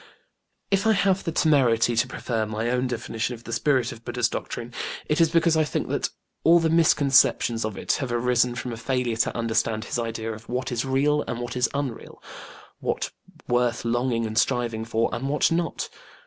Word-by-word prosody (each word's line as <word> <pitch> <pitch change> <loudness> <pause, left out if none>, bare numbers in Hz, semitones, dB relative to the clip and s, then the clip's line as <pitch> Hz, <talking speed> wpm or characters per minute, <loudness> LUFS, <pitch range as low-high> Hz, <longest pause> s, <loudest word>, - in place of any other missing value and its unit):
If 195 +2 +2
I 220 - +5
have 195 -2 +2
the 165 - -1
temerity 125 -8 +3
to 115 +2 +2
prefer 115 -3 -2
my 110 +2 -2
own 125 +1 +1
definition 120 0 -3
of 115 - -15
the 115 - -6
spirit 130 0 +1
of 115 - -11
BudĖĢdĖĢha's 120 -1 0
doctrine, 120 +1 -5 0.3
it 150 +2 +1
is 165 - +5
because 165 0 +3
I 160 - +4
think 150 - -3
that - - -1 0.3
all 170 +1 +7
the 165 -1 +1
misconceptions 140 -7 +4
of 110 -2 -4
it - - -1
have 135 -3 -3
arisen 125 0 +2
from 125 -1 -4
a - - -6
failure 125 -1 -1
to 115 - 0
understand 115 -1 0
his 120 - -3
idea 115 -1 -3
of 110 +1 -12
what 125 +1 -2
is 120 +1 -1
real 145 +3 +2
and 120 - -3
what 120 0 -5
is 125 +1 +2
unreal, 140 -5 -4 0.6
what - - -2 0.4
worth 120 -1 +1
longing 120 0 0
and 110 0 0
striving 120 -3 0
for 115 0 +1
and 130 +3 -2
what 150 +3 +2
not. 165 0 -1
120 Hz, 195 wpm, -25 LUFS, 115-140 Hz, 0.6 s, all